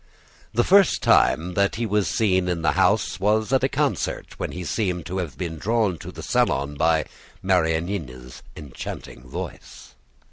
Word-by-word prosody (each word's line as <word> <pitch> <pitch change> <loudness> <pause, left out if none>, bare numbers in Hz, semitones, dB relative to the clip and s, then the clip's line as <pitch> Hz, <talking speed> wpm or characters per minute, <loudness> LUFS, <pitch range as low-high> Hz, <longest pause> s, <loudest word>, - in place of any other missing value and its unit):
The 120 - +2
first 195 +4 +4
time 85 +3 +3
that 100 +2 +1
he 115 +1 -2
was 105 -2 +1
seen 95 -4 +1
in 85 -2 -2
the - - +3
house - - +1
was 110 +5 +1
at 130 - +3
a 135 - +3
concert, 140 +1 -2
when - - -3
he 90 - -6
seemed 90 -6 -2
to 95 +3 -3
have 80 -8 -5
been 80 -3 -4
drawn 105 -5 0
to - - -8
the - - -9
salon 70 +1 +1
by 80 0 +2 0.4
Marianina's 80 -8 -1
enchanting 65 -4 -8
voice. - - -8
90 Hz, 165 wpm, -23 LUFS, 80-105 Hz, 0.4 s, first